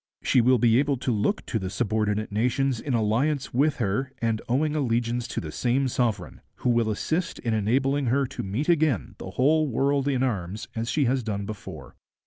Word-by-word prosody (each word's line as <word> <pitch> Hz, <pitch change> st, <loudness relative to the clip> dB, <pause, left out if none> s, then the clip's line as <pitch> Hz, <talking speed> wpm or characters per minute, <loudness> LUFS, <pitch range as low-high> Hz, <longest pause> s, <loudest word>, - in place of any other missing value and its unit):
She 125 Hz, -, +4 dB
will 125 Hz, +2 st, +4 dB
be 115 Hz, +1 st, +4 dB
able 140 Hz, -1 st, +1 dB
to 125 Hz, -, -2 dB
look 110 Hz, -, 0 dB
to 110 Hz, -, -2 dB
the 95 Hz, -2 st, -4 dB
subordinate 110 Hz, 0 st, -1 dB
nations 125 Hz, +4 st, +1 dB
in 135 Hz, -1 st, -2 dB
alliance 125 Hz, +7 st, 0 dB
with 145 Hz, +4 st, +2 dB
her 115 Hz, +4 st, -1 dB
and 115 Hz, -1 st, 0 dB
owing 150 Hz, +5 st, +1 dB
allegiance 120 Hz, -3 st, 0 dB
to -, -, -3 dB
the 80 Hz, -, -6 dB
same 130 Hz, -, +1 dB
sovereign, 115 Hz, -7 st, -2 dB
who 125 Hz, -, 0 dB
will 115 Hz, -2 st, +2 dB
assist 160 Hz, -, -2 dB
in 115 Hz, -3 st, -2 dB
enabling 130 Hz, +6 st, +1 dB
her 135 Hz, +3 st, +2 dB
to 135 Hz, -, -6 dB
meet 105 Hz, +10 st, -3 dB
again 155 Hz, -, +1 dB
the -, -, -7 dB
whole 150 Hz, +9 st, +2 dB
world 140 Hz, +2 st, +1 dB
in 130 Hz, -2 st, +1 dB
arms 105 Hz, -3 st, -3 dB
as 115 Hz, +1 st, -2 dB
she 150 Hz, -3 st, +1 dB
has 130 Hz, +2 st, +1 dB
done 100 Hz, -3 st, -3 dB
before.' 105 Hz, -3 st, -9 dB
120 Hz, 195 wpm, -26 LUFS, 110-135 Hz, -, She